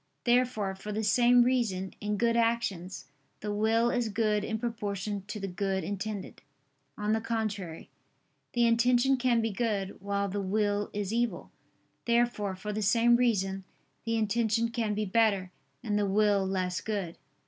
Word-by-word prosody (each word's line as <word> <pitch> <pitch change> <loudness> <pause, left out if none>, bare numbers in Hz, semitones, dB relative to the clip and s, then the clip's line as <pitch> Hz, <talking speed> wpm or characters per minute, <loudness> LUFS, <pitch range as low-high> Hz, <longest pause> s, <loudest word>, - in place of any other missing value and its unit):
Therefore, 240 -5 +2
for 195 +2 -7
the 215 +1 -2
same 240 +3 +5
reason, 225 -7 0
in 210 0 -1
good 230 +2 +2
actions, 230 -6 -1 0.4
the 210 0 -3
will 225 +3 +2
is 245 -2 0
good 210 -1 +1
in 220 +1 -2
proportion 205 -3 -3
to 210 - -5
the 195 - -3
good 190 +1 -2
intended. 205 0 -5 0.6
On 210 0 -1
the 220 - 0
contrary, 215 -7 -3 0.7
The 240 -1 +3
intention 245 +3 +4
can 245 -2 +2
be 225 0 -1
good, 200 -3 -2
while 200 0 -1
the 200 +1 -3
will 205 +1 0
is 205 0 -3
evil. 235 -5 -1 0.5
Therefore, 235 -4 +1
for 210 +3 -5
the 215 - -2
same 230 +3 +4
reason, 195 -6 +1 0.4
the 230 0 -1
intention 225 +1 +1
can 230 -3 -1
be 210 0 -1
better, 200 -3 +2 0.3
and 210 -1 0
the 205 - +1
will 200 -1 +2
less 185 -1 -1
good. 195 -6 -4
210 Hz, 160 wpm, -29 LUFS, 200-230 Hz, 0.7 s, same